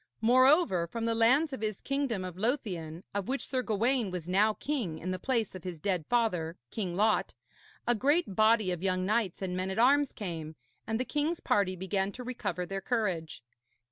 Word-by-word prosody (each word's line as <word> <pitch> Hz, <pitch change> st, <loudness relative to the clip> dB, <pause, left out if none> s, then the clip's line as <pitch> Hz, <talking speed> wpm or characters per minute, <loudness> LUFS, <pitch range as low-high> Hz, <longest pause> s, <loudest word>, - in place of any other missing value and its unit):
Moreover, 255 Hz, -, +4 dB
from 230 Hz, +5 st, -4 dB
the 230 Hz, -, +1 dB
lands 260 Hz, +7 st, +3 dB
of 260 Hz, -, -5 dB
his 215 Hz, -3 st, -2 dB
kingdom 270 Hz, -9 st, -1 dB
of 180 Hz, -2 st, -6 dB
Lothian, 185 Hz, -, -2 dB
of 200 Hz, -1 st, -2 dB
which 260 Hz, -2 st, -1 dB
Sir 260 Hz, -2 st, 0 dB
Gawaine 235 Hz, 0 st, +1 dB
was 180 Hz, -2 st, -5 dB
now 210 Hz, +4 st, +3 dB
king 240 Hz, -, -2 dB
in 185 Hz, +3 st, -4 dB
the 185 Hz, -, -3 dB
place 230 Hz, -2 st, 0 dB
of 185 Hz, -3 st, -9 dB
his 180 Hz, -3 st, -6 dB
dead 180 Hz, -3 st, -1 dB
father, 180 Hz, -9 st, +1 dB
King 185 Hz, -6 st, -3 dB
Lot, 215 Hz, +3 st, +2 dB, 0.5 s
a 240 Hz, -, +3 dB
great 280 Hz, -, +1 dB
body 215 Hz, -2 st, +4 dB
of 175 Hz, -2 st, -3 dB
young 185 Hz, -1 st, 0 dB
knights 210 Hz, -3 st, 0 dB
and 180 Hz, -1 st, -2 dB
men 185 Hz, +1 st, -2 dB
at 190 Hz, -, -4 dB
arms 275 Hz, +4 st, +4 dB
came; 165 Hz, -6 st, -6 dB, 0.3 s
and 225 Hz, +1 st, -1 dB
the 255 Hz, -, -1 dB
king's 305 Hz, +4 st, -1 dB
party 195 Hz, -2 st, +1 dB
began 190 Hz, +2 st, -1 dB
to 250 Hz, -, -7 dB
recover 205 Hz, -8 st, -3 dB
their 195 Hz, +2 st, -4 dB
courage. 185 Hz, -, -2 dB
210 Hz, 195 wpm, -30 LUFS, 185-245 Hz, 0.5 s, Moreover